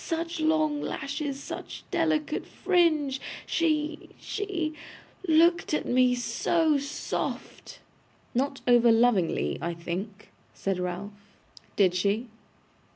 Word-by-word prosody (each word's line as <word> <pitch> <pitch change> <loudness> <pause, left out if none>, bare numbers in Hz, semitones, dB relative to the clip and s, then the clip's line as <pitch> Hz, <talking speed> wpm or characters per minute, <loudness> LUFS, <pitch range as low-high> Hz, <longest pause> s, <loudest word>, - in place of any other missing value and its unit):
Such 330 0 -3
long 310 -2 +2
lashes, 280 0 -3
such - - -7
delicate 315 -4 0
fringe! 310 -7 +2 0.2
She 310 -1 0
she 360 -7 -3 0.5
looked 335 0 +4
at - - -2
me 250 0 +3
so 290 +6 +1
soft.' 280 +1 -5 0.6
'Not 270 +2 -1
over 240 -1 +6
lovingly, 215 - +2
I 170 0 -2
think,' 190 +5 -6 0.2
said 195 -2 -2
Ralph. 180 +3 -4 0.6
'Did 185 -3 +4
she? 205 +6 0
280 Hz, 100 wpm, -27 LUFS, 215-315 Hz, 0.6 s, over